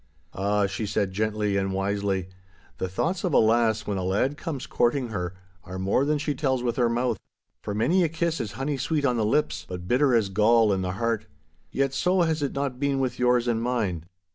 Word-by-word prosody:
'Ah,' 100 +1 +1
she 100 +2 -3
said 100 -1 0
gently 105 0 -1
and 95 0 -1
wisely, 95 -1 -1 0.5
'the 95 - -2
thoughts 170 - -1
of 180 -5 0
a - - +6
lass 110 -1 +3
when 100 -2 -2
a - - -2
lad 105 +10 +1
comes 150 -4 -5
courting 120 +1 +1
her, 90 -4 -4 0.3
are 95 +1 -7
more 100 +8 +1
than 150 +1 +1
she 145 0 -1
tells 130 -4 0
with 120 -1 0
her 120 -2 +2
mouth. 120 -2 0 0.4
For 105 - -4
many 175 - +3
a 165 - +1
kiss 165 +1 -1
is 105 - -5
honey 140 +2 -2
sweet 145 +2 0
on 125 -3 +2
the 110 - +1
lips, 105 - +1
but 90 0 -6
bitter 130 +2 +3
as 110 -4 +2
gall 110 +2 +4
in 95 - -1
the 90 -1 -2
heart. 110 +1 -1 0.4
Yet 135 0 0
so 180 +3 +2
has 160 -2 0
it 140 - -1
not 140 -2 -2
been 140 -1 +1
with 125 -2 -2
yours 125 -1 +3
and 115 -1 +1
mine. 110 -9 -1
115 Hz, 215 wpm, -26 LUFS, 100-140 Hz, 0.5 s, a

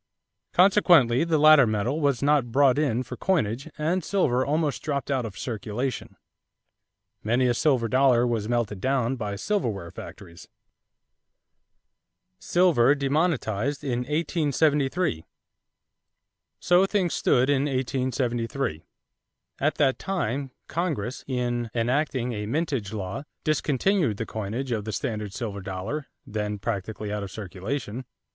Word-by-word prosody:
Consequently 175 - +5
the 165 -2 +1
latter 155 -4 +7
metal 110 +8 -1
was 140 -3 +1
not 145 -5 +2
brought 135 +1 +4
in 130 -5 +1
for - - -7
coinage 135 - -1
and 165 +4 0
silver 130 -10 +1
almost 145 -3 0
dropped 140 -2 -2
out 130 -3 0
of 105 - -11
circulation. 120 +2 -4 1.1
Many 120 +4 +2
a 125 - +3
silver 125 -3 +2
dollar 130 -1 +4
was 115 -3 -1
melted 115 -5 -1
down 130 -1 +1
by 105 -4 -4
silverware 105 - -2
factories. 85 0 -11 1.9
=Silver 150 -7 +3
Demonetized 140 - 0
in 125 -3 -1
1873.= 150 - 0 1.4
So 180 +2 +4
things 190 -4 0
stood 125 +1 +2
in 140 -1 +2
1873. 130 - -1 0.8
At 150 +3 +1
that 135 -3 +2
time, 140 - -2 0.2
Congress, 145 - -3
in 120 -2 -1
enacting 125 +1 0
a 105 -1 -4
mintage 135 -6 -2
law, 100 +3 -4 0.2
discontinued 155 - +1
the 115 - -3
coinage 110 +6 -4
of 110 -3 -2
the 110 - -4
standard 105 -2 -3
silver 100 -3 -5
dollar, 100 +11 -4 0.2
then 105 -1 -3
practically 105 0 -4
out 105 - -2
of 100 - -5
circulation. 110 +6 -5
130 Hz, 125 wpm, -26 LUFS, 110-150 Hz, 1.9 s, latter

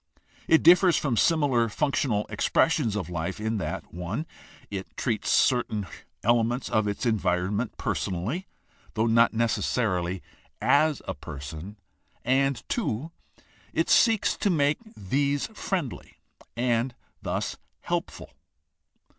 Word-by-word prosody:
It 160 - +5
differs 180 0 +7
from 135 -5 0
similar 135 -5 +3
functional 130 -4 0
expressions 115 +2 +1
of 100 -6 -2
life 90 +3 -4
in 110 +1 -1
that - - -3
(i) 90 - -3 0.5
it 95 -2 -6
treats 115 -5 -1
certain 115 -5 +2 0.4
elements 120 +2 +2
of 110 -1 +1
its 100 +5 -2
environment 100 0 0
personally 110 - -2 0.5
(though 110 0 +2
not 115 0 +4
necessarily 95 -6 0 0.4
as 150 0 +3
a - - -2
person), 75 +8 -8 0.5
and 135 0 +1
(2) 165 - -2 0.6
it - - +1
seeks 225 -4 +4
to 205 - +1
make 145 -4 +2 0.2
these 140 +8 0
friendly 175 - -4 0.4
and 120 0 0 0.3
so - - -2 0.2
helpful. - - -4
115 Hz, 115 wpm, -27 LUFS, 105-145 Hz, 0.6 s, differs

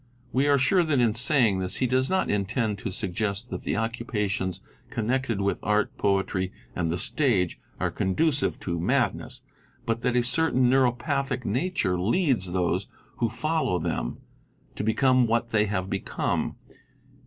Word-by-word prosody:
We 135 +3 +2
are 145 -1 +5
sure 160 +8 +3
that 155 -5 +1
in 115 -3 +3
saying 120 -5 +3
this 95 0 -2
he 130 - 0
does 130 +1 +2
not 190 0 +1
intend 105 +1 -1
to - - -4
suggest 100 +4 -3
that - - -4
the - - -2
occupations 105 -5 -2 0.3
connected 120 -1 -1
with 100 0 0
art, 105 0 +1
poetry 95 -2 0 0.2
and 85 -2 -1
the 85 - -1
stage 110 - +1 0.2
are - - 0
conducive 140 - 0
to 85 -2 -2
madness, 120 +3 0 0.4
but 115 -1 -1
that 125 -1 0
a 120 - +3
certain 130 0 +2
neuropathic 135 +1 +1
nature 120 - 0
leads 115 - +1
those 90 -1 0 0.3
who 115 - +1
follow 155 - 0
them 80 -8 -2 0.6
to - - -3
become 130 +3 +3
what 115 +1 +1
_ - - -25
they 105 -1 +3
have 95 -2 -2
become, 95 0 -2
7.¢. - - -20
115 Hz, 160 wpm, -26 LUFS, 95-130 Hz, 0.6 s, are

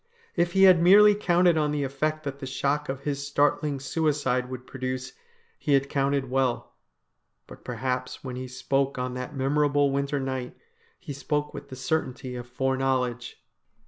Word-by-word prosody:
If 175 0 +1
he 195 - +4
had 185 -3 +7
merely 205 +4 +7
counted 175 -4 +3
on 150 -1 +1
the 150 -1 -1
effect 155 +3 -2
that 140 -1 -5
the 135 - -6
shock 140 +2 -1
of 135 0 -4
his 140 -1 -3
startling 145 0 +1
suicide 135 -3 0
would 130 -1 -7
produce 130 -1 -5 0.5
he 145 - 0
had 140 0 +1
counted 140 -1 0
well. 130 -2 0 0.7
But - - -14
perhaps 125 +1 -3
when 130 -2 -5
he 130 0 -5
spoke 135 +2 -1
on 125 0 -3
that 125 +2 -6
memorable 145 +1 +2
winter 140 +1 -1
night, 130 -2 -4 0.4
he 175 -6 -7
spoke 150 +2 -2
with 140 - -9
the 130 - -7
certainty 130 -2 -2
of 120 0 -7
foreknowledge. 130 -1 -1
135 Hz, 165 wpm, -26 LUFS, 130-150 Hz, 0.7 s, had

